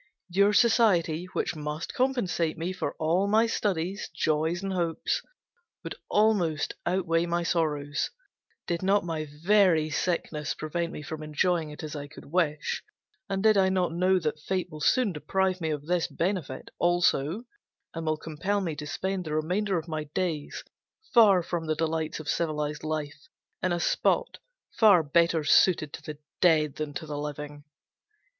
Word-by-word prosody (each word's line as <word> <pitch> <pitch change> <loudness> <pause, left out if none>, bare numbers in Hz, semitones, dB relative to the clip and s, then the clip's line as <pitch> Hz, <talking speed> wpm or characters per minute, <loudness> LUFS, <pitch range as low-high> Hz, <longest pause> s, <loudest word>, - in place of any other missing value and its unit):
Your 200 +3 +4
society, 205 -8 +3
which - - -1
must 150 +1 -5
compensate 235 -11 0
me 170 +3 -3
for 185 - -3
all 170 +5 +1
my 220 +3 +4
studies, 195 -3 -2
joys, 160 +2 0
and 195 -1 -2
hopes, 170 -3 -1 0.6
would - - -5 0.2
almost 195 -8 +2
outweigh 175 -2 +1
my 170 0 0
sorrows, 150 -4 0 0.6
did 170 -1 -2
not 195 0 +2
my 160 -2 -3 0.2
very 180 -6 +4
sickness 155 -2 -1
prevent 170 +2 -3
me 150 - -7
from 155 +2 -6
enjoying 155 +2 0
it 150 +2 -9
as 155 0 -5
I 145 -1 -5
could 150 - -13
wish, 155 -2 -1 0.5
and 195 0 -1
did 215 -1 +5
I 190 -1 +4
not 180 -3 0
know 185 +2 +3
that 155 -3 -2
Fate 185 +3 -2
will 155 0 -9
soon 205 - +3
deprive 185 +4 -1
me 160 - -1
of 150 -2 -3
this 175 0 +1
benefit, 170 -7 -3
also, 175 - +2 0.5
and 165 -1 -5
will 155 0 +1
compel 165 +7 -2
me 170 -6 -3
to 150 0 -6
spend 190 +3 -3
the 155 -1 -3
remainder 185 +5 0
of 165 0 -4
my 155 -2 -3
days, 170 -6 -2 0.5
far 205 -7 +6
from 170 -1 -3
all - - -9
the 155 - +1
delights 160 0 -2
of 155 - -9
civilized 150 -2 -1
life, 155 -1 -4 0.3
in 185 - 0
a 175 - 0
spot, - - +1 0.3
far 200 -7 +5
better 165 +2 +2
suited 155 -1 +4
to - - -7
the 150 -1 -7 0.2
dead 155 -5 +3
than 155 -1 -3
to 160 - -4
the 150 -1 -5
living. 145 0 -6
165 Hz, 165 wpm, -27 LUFS, 155-185 Hz, 0.6 s, far